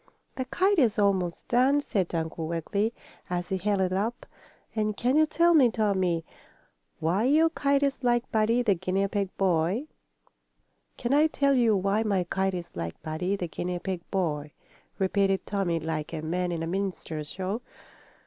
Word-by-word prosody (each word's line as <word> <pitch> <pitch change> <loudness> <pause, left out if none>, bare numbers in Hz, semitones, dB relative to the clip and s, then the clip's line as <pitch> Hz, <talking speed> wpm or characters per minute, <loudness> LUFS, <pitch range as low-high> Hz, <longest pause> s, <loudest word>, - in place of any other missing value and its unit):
"The 260 - -3
kite 375 +8 +2
is 230 -6 +3
almost 190 -4 +1
done," 260 +4 +4
said 190 -11 -1
Uncle 160 0 -3
Wiggily, 200 +7 -1 0.4
as 175 0 -2
he 190 - -1
held 200 +1 +1
it 185 -1 +1
up. 220 +6 -2 0.5
"And 215 -1 -1
can 250 +3 +1
you 310 0 +5
tell 340 +2 +3
me, 275 -7 +6
Tommie, 190 -7 0 0.7
why 180 +8 +1
your 315 +5 +4
kite 280 -2 +1
is 275 -2 -1
like 240 -1 +1
Buddy, 225 +3 +2
the 210 -4 +4
guinea 190 +2 0
pig 200 -1 -1
boy?" 185 - +1 1.1
"Can 245 +2 -1
I 300 +2 +5
tell 280 -2 +2
you 235 -5 +4
why 195 +3 +1
my 200 -4 +1
kite 190 +2 -1
is 175 -1 -7
like 85 -1 -5
Buddy, 160 +5 -1
the 180 -3 -3
guinea 175 +2 -3
pig 185 0 -4
boy?" 150 -6 -2 0.4
repeated 195 0 +1
Tommie, 190 -5 0
like 160 0 -4
a 155 -1 -4
man 175 +2 -1
in 165 -1 -2
a - - -3
minstrel 180 -4 -3
show. 190 +8 -4
195 Hz, 170 wpm, -27 LUFS, 175-240 Hz, 1.1 s, me